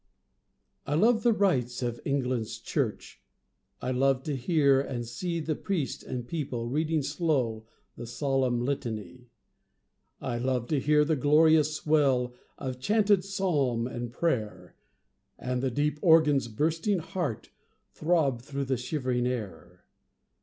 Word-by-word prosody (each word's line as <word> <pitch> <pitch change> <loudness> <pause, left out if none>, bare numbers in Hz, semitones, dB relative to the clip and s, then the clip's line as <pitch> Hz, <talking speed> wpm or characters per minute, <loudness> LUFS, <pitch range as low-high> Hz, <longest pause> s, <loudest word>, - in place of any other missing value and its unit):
I 145 - 0
love 225 +7 +4
the 240 - +4
rites 130 - +1
of 120 -1 -3
England's 125 -5 -1
church; 115 - -3 0.6
I 130 - -1
love 130 +1 +2
to 145 -1 -2
hear 140 0 +3
and 120 -4 -4
see 170 +8 -3
The 160 0 -1
priest 160 -3 -3
and 120 -1 -6
people 130 -7 -3
reading 155 +4 0
slow 130 -8 -1 0.3
The 120 - -8
solemn 125 0 0
Litany; 120 -4 -4 0.9
I 120 - -3
love 125 -1 0
to 150 - +2
hear 150 +2 +3
the 160 +1 +1
glorious 155 +2 +4
swell 135 -6 +2 0.2
Of 130 -1 -5
chanted 205 - +3
psalm 150 -12 0
and 120 -1 -5
prayer, 105 - -2 0.6
And 125 0 -2
the 135 - 0
deep 145 +3 -1
organ's 155 -6 +5
bursting 160 - 0
heart, 155 -9 -4 0.4
Throb 155 -7 +1
through 140 +2 -4
the 130 -1 0
shivering 125 -1 -1
air. 95 -7 -6
135 Hz, 130 wpm, -28 LUFS, 120-155 Hz, 0.9 s, organ's